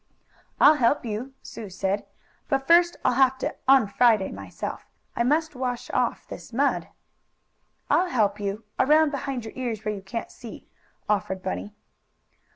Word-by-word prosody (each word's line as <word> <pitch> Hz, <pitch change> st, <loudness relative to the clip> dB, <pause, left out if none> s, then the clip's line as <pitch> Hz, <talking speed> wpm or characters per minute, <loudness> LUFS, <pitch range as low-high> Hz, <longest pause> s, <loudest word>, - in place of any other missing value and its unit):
"I'll 300 Hz, +1 st, +7 dB
help 245 Hz, +3 st, +3 dB
you," 235 Hz, +5 st, -5 dB
Sue 215 Hz, -3 st, -8 dB
said. 190 Hz, +2 st, -2 dB, 0.4 s
"But 270 Hz, -2 st, 0 dB
first 345 Hz, +2 st, +5 dB
I'll 255 Hz, -, +4 dB
have 265 Hz, +1 st, +3 dB
to -, -, -3 dB
un 265 Hz, -3 st, +6 dB
Friday 215 Hz, -1 st, +3 dB
myself. 95 Hz, -2 st, -7 dB, 0.3 s
I -, -, -1 dB
must 305 Hz, +6 st, +1 dB
wash 250 Hz, -1 st, -3 dB
off -, -, 0 dB
this -, -, -10 dB
mud." -, -, +1 dB, 1.0 s
"I'll 365 Hz, 0 st, +2 dB
help 210 Hz, -6 st, +1 dB
you 205 Hz, +2 st, -3 dB, 0.2 s
around 305 Hz, +2 st, +4 dB
behind 275 Hz, -4 st, -4 dB
your 220 Hz, -, -8 dB
ears 235 Hz, -5 st, -4 dB
where 215 Hz, -, 0 dB
you 200 Hz, -, -7 dB
can't 195 Hz, +4 st, -6 dB
see," 235 Hz, -, -11 dB, 0.4 s
offered 190 Hz, -2 st, -1 dB
Bunny. 205 Hz, +2 st, -4 dB
235 Hz, 155 wpm, -25 LUFS, 205-270 Hz, 1.0 s, I'll